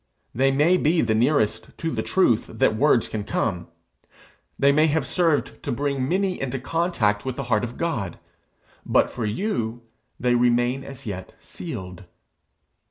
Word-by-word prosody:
They 135 +3 +3
may 150 +7 +3
be 165 0 +2
the 110 -2 +1
nearest 110 -2 +1
to 165 - -2
the - - -1
truth 120 - +2
that 110 0 +1
words 130 -1 +3
can 105 -2 -4
come; 90 -4 -2 0.9
they 140 0 +4
may 155 +3 +4
have 155 -2 0
served 165 +1 0
to 140 - -3
bring 140 0 -1
many 190 0 0
into 135 0 -2
contact 130 - 0
with 130 -1 -3
the 140 - -4
heart 105 - +2
of 120 0 -5
God; 120 - -2 0.7
but - - +2
for 115 - -3
you 115 - -2 0.4
they 125 0 +2
remain 120 +2 +2
as 135 -1 -10
yet 95 -4 -6
sealed. 95 - -8
130 Hz, 160 wpm, -24 LUFS, 110-150 Hz, 0.9 s, they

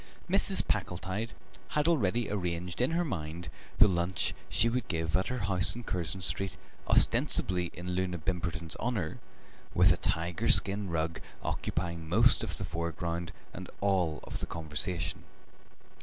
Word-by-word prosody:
Mrs. - - +3
Packletide 95 +6 -2 0.4
had 150 +1 +4
already 120 - +2
arranged 90 -1 -2
in 125 - +3
her 170 +2 +1
mind 85 - -4 0.3
the 105 - +8
lunch 90 0 0 0.2
she 115 - +3
would 125 +2 -1
give 80 -2 -1
at 95 - +1
her 125 - -2
house 90 -1 +3
in 120 - -6
Curzon 90 -2 -2
Street, 95 +1 +1 0.3
ostensibly 90 -1 +3
in 90 +1 -6
Loona 90 -1 -1
Bimberton's 85 -1 -2
honour, 105 -10 -2 0.6
with 90 +2 +6
a - - -4
tiger 85 0 0
skin 100 0 +4
rug 80 0 -1 0.2
occupying 85 -2 -3
most 115 +8 +5
of - - -4
the 95 - -3
foreground 85 +1 -3 0.2
and 95 +1 -7
all 90 -6 +1
of - - -6
the - - -4
conversation. 80 +1 -3
90 Hz, 145 wpm, -31 LUFS, 85-100 Hz, 0.6 s, the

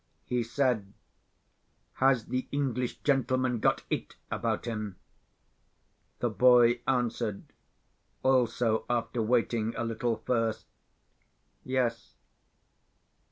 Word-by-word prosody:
He 125 -1 0
said: 115 -4 0 1.1
"Has 130 -4 +4
the 130 0 -3
English 130 -3 -2
gentleman 130 -3 +1
got - - +2
It - - -3 0.2
about - - -1
him?" 110 -4 -4 1.3
The - - +2
boy 120 -1 +5
answered—also, 120 0 -1
after 120 0 -1
waiting 115 -1 +1
a 120 - -1
little 115 0 -1
first—"Yes." 115 +1 -4
120 Hz, 80 wpm, -29 LUFS, 115-130 Hz, 1.3 s, boy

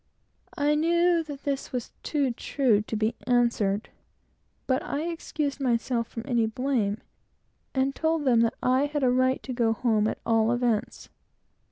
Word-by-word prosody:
I 290 +1 +2
knew 340 +2 +3
that 290 -2 -8
this 275 -1 -3
was 250 -2 -4
too 285 -4 0
true 235 -2 +1
to 220 - -5
be 220 +1 0
answered, 235 -4 +1 0.8
but 260 +2 +1
I 290 - -3
excused 310 -4 -3
myself 235 -2 0
from 230 - -7
any 235 -3 +1
blame, 225 -3 -1 0.8
and 265 +1 +1
told 320 0 0
them 245 -3 +4
that 230 -1 +1
I 260 +3 +3
had 295 -1 -2
a 250 - +4
right 255 +1 +2
to 260 - -5
go 230 -2 +2
home, 220 -2 +1
at - - -2
all 225 0 +3
events. 240 -3 -1
255 Hz, 160 wpm, -27 LUFS, 230-285 Hz, 0.8 s, them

